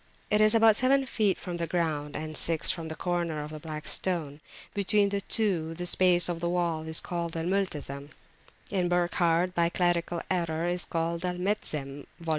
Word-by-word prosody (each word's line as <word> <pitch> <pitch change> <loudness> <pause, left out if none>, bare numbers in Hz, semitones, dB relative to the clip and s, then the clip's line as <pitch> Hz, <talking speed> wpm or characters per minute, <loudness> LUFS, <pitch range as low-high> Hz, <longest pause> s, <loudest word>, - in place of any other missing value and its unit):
It 210 0 +4
is 215 +1 +6
about 225 -1 +6
seven 270 +3 +4
feet 215 -6 +1
from 175 -2 -6
the 170 -1 -3
ground, 155 -4 -2
and 155 0 -5
six 165 0 +3
from 170 -3 -5
the 160 - -6
corner 170 -4 -2
of 150 - -8
the 155 - -7
Black 155 -1 -7
Stone. 155 -4 -2 0.3
Between 200 0 +2
the 200 0 -1
two 180 -8 +1
the 175 +1 -4
space 175 -1 +4
of 170 -1 -3
wall 170 -2 0
is 160 0 +4
called 170 -1 -4
Al 165 - -2
Multazem 150 -7 -2 0.6
(in 185 -3 0
Burckhardt, 175 0 +1
by 170 -1 +2
a - - -2
clerical 175 -1 0
error, 170 -3 -1 0.3
Al 170 +2 -1
Metzem, 150 -8 -3
vol. 165 -1 -7
170 Hz, 180 wpm, -28 LUFS, 160-185 Hz, 0.6 s, is